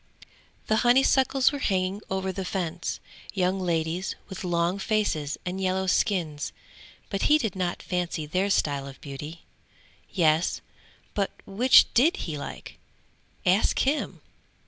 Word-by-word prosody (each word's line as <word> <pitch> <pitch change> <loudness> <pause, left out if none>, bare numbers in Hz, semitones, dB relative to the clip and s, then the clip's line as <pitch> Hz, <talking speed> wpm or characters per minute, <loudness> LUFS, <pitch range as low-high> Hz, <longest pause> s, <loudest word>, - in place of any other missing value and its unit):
The 220 - +2
honeysuckles 265 +2 +4
were 285 - -4
hanging 190 -3 0
over 190 0 -1
the 190 +1 -4
fence 175 -2 -3 0.4
young 185 0 +1
ladies 170 0 -1
with 190 -1 -7
long 175 +1 0
faces 195 -9 0
and 185 +2 -3
yellow 190 0 0
skins 170 -6 0 0.6
but 195 - -1
he 300 - +7
did 220 -10 -2
not 180 -2 -2
fancy 175 -3 -2
their 185 +6 0
style 140 -7 +1
of 135 - -11
beauty. 150 +4 -8 0.7
Yes, 160 -2 +2 0.5
but 200 -2 0 0.2
which 245 +6 +6
did 295 +9 +4
he 160 - -4
like? 145 - -8 0.7
Ask 185 +4 +3
him! 285 +3 0
185 Hz, 130 wpm, -26 LUFS, 170-205 Hz, 0.7 s, he